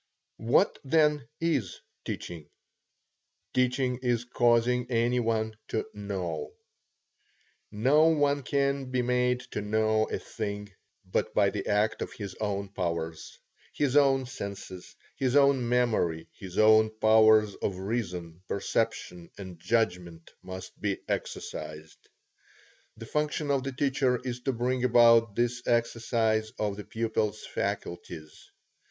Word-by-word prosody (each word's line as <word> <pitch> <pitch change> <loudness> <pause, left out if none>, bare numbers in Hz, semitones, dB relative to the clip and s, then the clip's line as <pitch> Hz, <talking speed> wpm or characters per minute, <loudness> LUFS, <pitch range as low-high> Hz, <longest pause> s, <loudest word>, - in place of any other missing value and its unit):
What, 120 - +3
then, 150 -2 +2
is 145 - -1 0.3
teaching? 80 -4 -6 1.0
Teaching 125 0 +1
is 120 -2 0
causing 120 0 +2
any 120 +1 +2
one 110 -2 -1
to 110 - -2
know. 95 -6 -4 1.2
Now 110 +6 0
no 150 +1 +6
one 145 -3 +3
can 140 -1 0
be 130 -1 0
made 125 0 +1
to - - -3
know 110 +1 +1
a - - -2
thing 105 -2 -5 0.4
but - - -2
by - - +4
the - - -4
act 105 +2 +1
of - - -4
his 100 -4 -7
own 100 -2 -2
powers. 85 -4 -4 0.4
His 145 -2 0
own 135 -2 +4
senses, 100 -6 -8 0.2
his 130 -1 0
own 140 -4 +4
memory, 110 -10 +1
his 95 -2 -10
own 110 0 +6
powers 110 -1 +5
of 95 - -2
reason, 90 -5 -4
perception, 100 -4 -2
and 95 -4 -9
judgment, 90 -6 -1
must 95 0 -9
be 100 -2 0
exercised. 75 +1 -6 0.9
The 115 - -8
function 150 +2 -1
of 140 -1 +2
the 135 +1 -4
teacher 130 -2 +1
is 125 -1 -4
to 135 +2 -1
bring 125 +1 -1
about 115 -3 +5
this 120 +1 0
exercise 115 -2 +1
of 105 -2 -1
the 105 - -8
pupil's 110 -2 -2
faculties. 85 -3 -5
115 Hz, 125 wpm, -28 LUFS, 100-125 Hz, 1.2 s, no